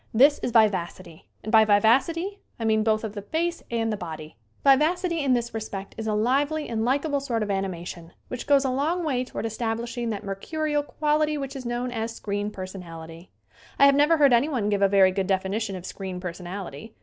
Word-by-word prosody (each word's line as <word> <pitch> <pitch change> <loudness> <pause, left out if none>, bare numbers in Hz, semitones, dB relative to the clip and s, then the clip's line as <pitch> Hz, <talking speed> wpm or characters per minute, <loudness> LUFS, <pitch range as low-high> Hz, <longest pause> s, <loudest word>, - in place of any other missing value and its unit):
That 280 +5 +6
is - - -1
vivacity, 185 -7 0 0.2
and 215 - -4
by 220 -1 +7
vivacity 270 - +2 0.2
I 225 - -2
mean 220 -1 +3
both 215 0 +1
of 215 -2 -4
the 205 - -5
face 335 +10 -2
and 225 -2 -1
the - - -3
body. 160 -4 -8 0.3
Vivacity 330 +5 +3
in 275 -3 +2
this 235 -1 -1
respect 205 -3 -6
is 220 -1 -5
a 215 - 0
lively 285 +7 +1
and 225 -1 -2
likable 280 +4 +1
sort 240 -5 -2
of 205 - -2
animation 175 -3 -4 0.2
which 250 - -6
goes 280 -1 +4
a 260 - +1
long 315 +7 0
way 260 -5 0
toward 250 - -5
establishing 230 +1 -3
that 210 -3 -4
mercurial 295 +10 -2
quality 300 +1 0
which 275 -1 -5
is 255 -3 -6
known 240 +1 -2
as 225 -1 -3
"screen 205 0 -3
personality." 175 -4 -9 0.5
I 280 - +7
have 280 - +7
never 295 +4 +4
heard 285 -4 +5
anyone 240 -4 +2
give 205 -1 0
a 200 - +6
very 195 -1 +5
good 190 0 -2
definition 195 +2 -1
of 180 -1 -8
"screen 190 -2 -6
personality." 180 0 -7
225 Hz, 195 wpm, -25 LUFS, 195-280 Hz, 0.5 s, by